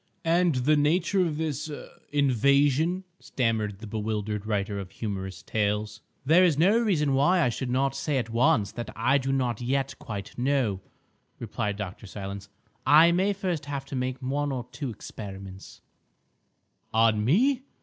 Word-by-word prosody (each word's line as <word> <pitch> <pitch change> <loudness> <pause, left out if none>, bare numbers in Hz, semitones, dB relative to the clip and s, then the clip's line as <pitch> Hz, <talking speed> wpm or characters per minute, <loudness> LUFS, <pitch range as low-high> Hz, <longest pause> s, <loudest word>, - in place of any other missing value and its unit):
"And 170 -1 +3
the 135 +5 +3
nature 170 +6 +2
of 160 -4 -2
this—er—invasion?" 145 - 0 0.2
stammered 110 -5 -1
the 110 - -10
bewildered 105 -1 -3
writer 100 -1 -1
of 95 -2 -7
humorous 95 -4 -5
tales. 105 0 -1 0.2
"There 165 +6 +6
is 165 -6 +3
no 195 +8 +4
reason 160 -11 +1
why 145 +7 +3
I - - +3
should 125 +2 -4
not 135 +2 +1
say 140 +1 -1
at 115 -3 -2
once 115 -3 +2
that 120 - -6
I 130 +5 +2
do 135 0 -2
not 125 -4 0
yet 135 +2 -1
quite 100 -2 -7
know," 125 -7 +1 0.6
replied 105 -1 -3
Dr. 105 +1 -6
Silence. 100 0 -7 0.3
"I 160 +3 +7
may 190 +4 +2
first 180 -6 -3
have 140 -1 -4
to 135 - -7
make 130 0 -2
one 145 +2 -1
or 125 -3 -3
two 140 0 -4
experiments—" 95 -3 -9 1.1
"On 110 -1 +3
me?" 245 - +3
130 Hz, 150 wpm, -27 LUFS, 105-150 Hz, 1.1 s, I